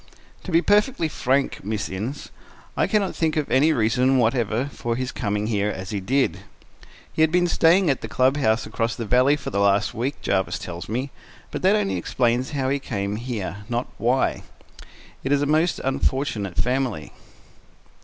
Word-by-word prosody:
"To 185 - -5
be 165 +1 +4
perfectly 210 -4 +2
frank, 135 -2 0
Miss 105 +1 -2
Innes, 110 +10 -5 0.4
I - - +2
can 210 -2 +2
not 190 - -4
think 160 -1 0
of 150 - -1
any 145 +5 +4
reason 125 +1 +2
whatever 120 0 +1
for 115 0 -2
his 130 +1 -3
coming 105 -2 -2
here 105 -2 0
as 95 0 -6
he 105 - -2
did. 95 -3 0 0.7
He - - -1
had 160 0 +4
been 175 +1 +3
staying 175 +2 +4
at 135 -3 +1
the - - -5
club 130 +2 +2
house 110 -6 +1
across 115 +1 -2
the 115 - -4
valley 125 +6 +4
for 150 - -6
the 100 - -1
last 100 +1 +2
week, 130 +5 -3
Jarvis 95 -1 0
tells 85 +1 -7
me, 130 +5 -2 0.4
but - - -4
that 190 +3 +4
only 95 - 0
explains 120 +7 0
how 135 -3 -1
he 140 +1 0
came 100 -5 -3
here, 110 -5 -4
not 120 +1 -1
why. 125 +3 +1 0.8
It 135 - -2
is 145 0 +3
a - - +1
most 155 +4 +2
unfortunate 130 -8 -1
family." 125 - -1
125 Hz, 185 wpm, -23 LUFS, 105-145 Hz, 0.8 s, be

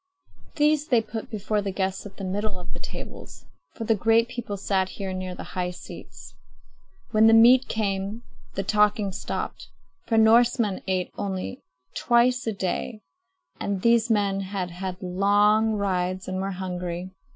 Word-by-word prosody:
These 300 0 +2
they 240 -4 +3
put 220 0 -6
before 210 -1 -1
the 200 - -3
guests 190 +1 -2
at 195 - -16
the 195 - -7
middle 200 +1 -2
of 180 - -8
the - - -7
tables; - - -9 0.3
for 230 - -5
the 225 - +3
great 225 +3 +3
people 235 -5 -5
sat 190 -1 0
here 190 -1 -5
near 185 -1 -4
the - - -7
high 180 -1 -1
seats. 180 -4 -11 0.8
When 220 +1 +5
the 225 - +7
meat 245 +3 +7
came, 205 +1 -2 0.3
the 195 - -1
talking 210 0 +2
stopped; - - -5 0.4
for 225 - +2
Norsemen 225 -2 +4
ate 185 -1 -1
only 190 - -4 0.3
twice 245 +1 +2
a - - +2
day, 200 +2 -3 0.6
and 200 -2 -2
these 235 0 +4
men 200 -3 +2
had 190 -2 -4
had 185 +1 -6
long 205 +4 +3
rides 185 -2 -1
and 185 0 -2
were 195 - -2
hungry. 180 -1 -4
200 Hz, 160 wpm, -25 LUFS, 185-225 Hz, 0.8 s, the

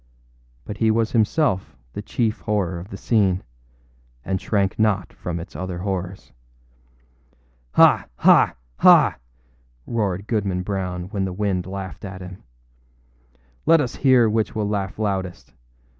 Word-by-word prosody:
But 105 - -6
he 110 0 +2
was 110 0 +1
himself 110 - +1 0.2
the - - -5
chief 110 +1 -1
horror 95 -5 -1
of 90 +4 -10
the 95 - -7
scene, 100 -5 +1 0.8
and 95 -1 -2
shrank 100 -2 0
not 105 -3 +1
from 85 -1 -5
its 85 - -10
other 90 +2 -4
horrors. 95 0 -4 1.4
âHa! - - +6
ha! - - +5 0.2
ha!â - - +6 0.7
roared 100 -4 -2
Goodman 100 -5 -1
Brown 90 -2 -3
when 100 -2 -2
the 95 - -3
wind 95 -2 -1
laughed 95 -4 -7
at 95 -2 -7
him. 90 +1 -10 1.3
âLet 165 0 +6
us 130 -5 -2
hear 130 -4 +5
which 110 +2 -1
will 105 -2 -1
laugh 100 -2 -3
loudest. 95 -4 -3
100 Hz, 135 wpm, -22 LUFS, 95-110 Hz, 1.4 s, âHa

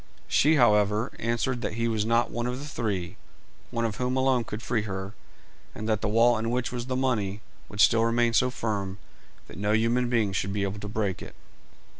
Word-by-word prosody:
She, 155 +3 +4
however, 105 -3 +3
answered 120 +2 -1
that 105 - -3
he 115 0 0
was 110 -2 0
not 115 +1 +2
one 120 0 -2
of 125 0 -3
the 140 - -7
three, 105 -11 -3 0.5
one 115 -1 -1
of 110 -3 -3
whom 125 +1 -1
alone 130 -2 +2
could 110 +1 -6
free 115 -3 0
her, 95 -1 -5 0.6
and 110 - -5
that 110 -2 +1
the 110 - 0
wall 115 +2 +4
in 115 +1 -2
which 125 +1 -1
was 120 0 -4
the 130 - -2
money 110 -6 -1 0.3
would 105 - -9
still 115 -1 +5
remain 115 0 +2
so 125 +3 +3
firm 100 -6 -3 0.5
that - - -11
no 105 +1 +1
human 120 +3 +2
being 110 -5 +1
should 95 0 -1
be 100 -1 -1
able 100 +1 -3
to 105 - -6
break 105 -3 -2
it. - - -10
115 Hz, 210 wpm, -27 LUFS, 105-120 Hz, 0.6 s, still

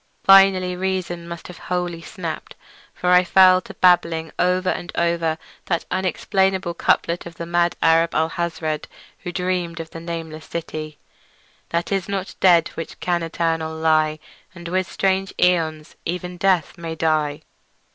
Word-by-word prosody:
Finally 195 -2 +6
reason 180 -2 -3
must 170 -1 -8
have 180 - -11
wholly 175 -2 -2
snapped, 165 -1 -6 0.4
for 180 - -1
I 180 0 +7
fell 185 0 +6
to - - -11
babbling 165 -3 +3
over 185 +1 +2
and 175 - -5
over 170 -2 0 0.3
that 170 -2 -1
unexplainable 190 -1 0
couplet 170 +1 0
of 170 - -11
the 170 - -6
mad 175 0 +1
Arab 165 +1 +4
Alhazred, 160 -1 -1 0.3
who 180 - -6
dreamed 180 -2 -2
of 165 0 -7
the 165 - -7
nameless 165 -2 -6
city: 155 -2 -6 0.7
"That 170 +3 -2
is 195 -1 -1
not 195 -1 -3
dead 170 -3 +5
which 165 - -8
can 175 -1 0
eternal 165 -1 -2
lie, 155 -1 +2 0.4
And 170 -1 -9
with 185 0 -1
strange 195 0 0
aeons 160 -3 +1
even 180 +1 -4
death 180 -3 +1
may 165 -1 -5
die." 155 -2 0
170 Hz, 145 wpm, -22 LUFS, 165-180 Hz, 0.7 s, I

